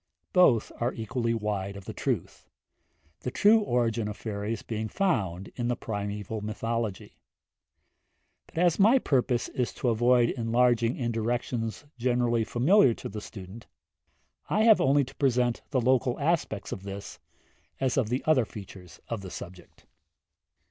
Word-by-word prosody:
Both 140 - +4
are 120 +2 0
equally 115 +1 -1
wide 100 -2 -3
of 100 - -11
the - - -6
truth, - - -3 0.7
the - - -4
true 210 - +5
origin 120 - 0
of 105 - -6
fairies 105 0 -4
being 110 -1 -3
found 100 - -1
in 120 -1 -2
the 120 - +1
primeval 105 -2 -4
mythology; 110 -1 -3 1.3
but - - -17
as 175 0 +3
my 220 +7 +6
purpose 125 - +1
is 125 -2 -2
to 125 - -1
avoid 120 +1 +4
enlarging 120 0 +2
in 120 -3 -1
directions 115 +1 -2
generally 120 -1 +1
familiar 125 - +4
to - - -7
the 105 +1 -6
student, 105 +1 -10 0.8
I 215 - +2
have 220 -2 +6
only 140 +2 +4
to 130 - -10
present 125 -3 +1
the 135 - +1
local 125 0 +2
aspects 145 -9 -1
of 95 - -5
this, 100 +1 -8 0.6
as 130 -2 +1
of 125 -6 +1
the 125 +3 -1
other 155 -6 +4
features 95 -4 -11
of 115 -3 -4
the 95 - -8
subject. 90 0 -11
115 Hz, 150 wpm, -28 LUFS, 105-130 Hz, 1.3 s, my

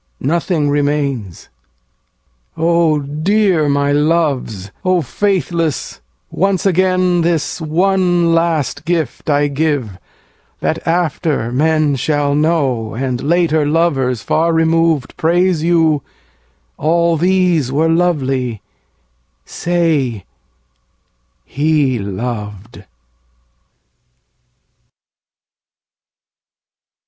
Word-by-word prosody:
Nothing 165 +1 0
remains. 140 - -2 1.1
O 165 -2 +2
dear 160 +3 +1
my 140 0 +1
loves, 145 - 0
O 185 -2 +1
faithless, 170 - -2 0.3
once 195 0 0
again 185 -1 +2
This 165 -1 -1
one 175 +1 +1
last 160 -4 0
gift 160 -4 -2
I 145 0 +2
give: 140 - -2 0.6
that - - -3
after 165 -7 -1
men 155 +2 +1
Shall 145 +1 0
know, 140 -8 0
and 125 0 -2
later 160 0 +1
lovers, 145 -7 0
far 165 +1 +1
removed, 165 -3 +1
Praise 175 0 +1
you, 160 -3 +2 0.8
"All 170 +2 +2
these 175 -5 +1
were 155 +4 +1
lovely"; 135 - 0 0.8
say, 155 - -1 1.2
"He 145 -3 0
loved." 105 0 -6
155 Hz, 80 wpm, -16 LUFS, 135-170 Hz, 1.2 s, O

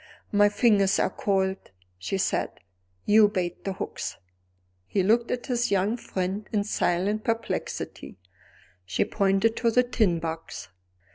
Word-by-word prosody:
"My 205 0 +5
fingers 205 -2 +3
are - - +1
cold," 190 -1 -1 0.3
she 145 - -2
said; 190 - 0 0.6
"you 210 0 +6
bait 180 -4 -3
the 195 - -1
hooks." 190 - -5 0.7
He 195 - 0
looked 230 +4 +3
at 245 - -2
his 245 -1 0
young 200 +3 +1
friend 190 -2 -4
in 210 -2 +1
silent 205 +1 0
perplexity; 230 - -3 0.7
she 90 0 0
pointed 200 +2 +2
to 235 - +2
the 250 +2 +4
tin 215 -8 +1
box. 165 -6 -6
205 Hz, 135 wpm, -26 LUFS, 190-225 Hz, 0.7 s, you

